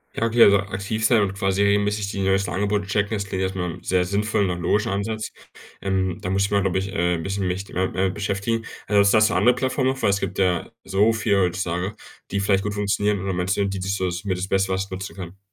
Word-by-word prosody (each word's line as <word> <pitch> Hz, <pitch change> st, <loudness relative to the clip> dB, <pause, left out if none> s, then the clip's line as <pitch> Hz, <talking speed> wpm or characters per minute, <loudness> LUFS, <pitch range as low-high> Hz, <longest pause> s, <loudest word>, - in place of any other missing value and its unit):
Ja, 115 Hz, -, 0 dB
okay, 115 Hz, +1 st, +5 dB
also, 100 Hz, 0 st, +7 dB
aktiv 100 Hz, +3 st, -3 dB
sein 115 Hz, -1 st, +4 dB
und 95 Hz, -1 st, -1 dB
quasi 95 Hz, -1 st, 0 dB
regelmäßig 100 Hz, 0 st, +2 dB
die 100 Hz, -, -4 dB
neuesten 95 Hz, +1 st, +1 dB
Angebote 100 Hz, +1 st, -1 dB
checken, 100 Hz, +2 st, 0 dB
das 100 Hz, -1 st, -3 dB
klingt 95 Hz, -1 st, -3 dB
jetzt 95 Hz, 0 st, -2 dB
erstmal 90 Hz, -3 st, -3 dB
sehr 90 Hz, -1 st, +1 dB
sinnvollen 100 Hz, +1 st, 0 dB
und 90 Hz, -, -2 dB
nach 85 Hz, -, -6 dB
logischen 105 Hz, +4 st, +1 dB
Ansatz. 110 Hz, +2 st, -3 dB, 0.5 s
Ähm, 95 Hz, -2 st, 0 dB
da 90 Hz, -, -4 dB
muss 100 Hz, +1 st, +2 dB
ich -, -, -5 dB
mal 100 Hz, 0 st, +3 dB
glaube 95 Hz, -1 st, +1 dB
ich, 95 Hz, +1 st, -4 dB
äh, 90 Hz, 0 st, +1 dB
'n -, -, -5 dB
bisschen 95 Hz, +2 st, -2 dB
mich, 95 Hz, +2 st, -3 dB
äh 95 Hz, +1 st, 0 dB
äh, -, -, -1 dB
beschäftigen. 105 Hz, +3 st, -2 dB, 0.2 s
Also, 100 Hz, 0 st, +4 dB
hast 110 Hz, 0 st, +5 dB
du -, -, -2 dB
andere 115 Hz, +7 st, +5 dB
Plattformen 130 Hz, +1 st, 0 dB
noch, 135 Hz, 0 st, -6 dB
weil -, -, +3 dB
es 100 Hz, 0 st, +2 dB
gibt 95 Hz, -1 st, -4 dB
ja 90 Hz, -1 st, +1 dB
so 100 Hz, +4 st, +2 dB
viele 105 Hz, -3 st, +1 dB
heutzutage, 90 Hz, +2 st, -1 dB, 0.4 s
die 100 Hz, -, 0 dB
vielleicht 100 Hz, 0 st, +2 dB
gut 105 Hz, -, -2 dB
funktionieren 105 Hz, 0 st, 0 dB
und 95 Hz, -2 st, -2 dB
meinst 90 Hz, +2 st, 0 dB
du 100 Hz, -, +1 dB
die 95 Hz, -1 st, -3 dB
da 95 Hz, -, -4 dB, 0.2 s
das 90 Hz, 0 st, -3 dB
mit 95 Hz, -2 st, -1 dB
das 95 Hz, -, -3 dB
Beste 95 Hz, 0 st, +1 dB
was 95 Hz, +1 st, -2 dB
nutzen 95 Hz, 0 st, -6 dB
kann. 95 Hz, -1 st, -8 dB
100 Hz, 250 wpm, -23 LUFS, 95-105 Hz, 0.5 s, also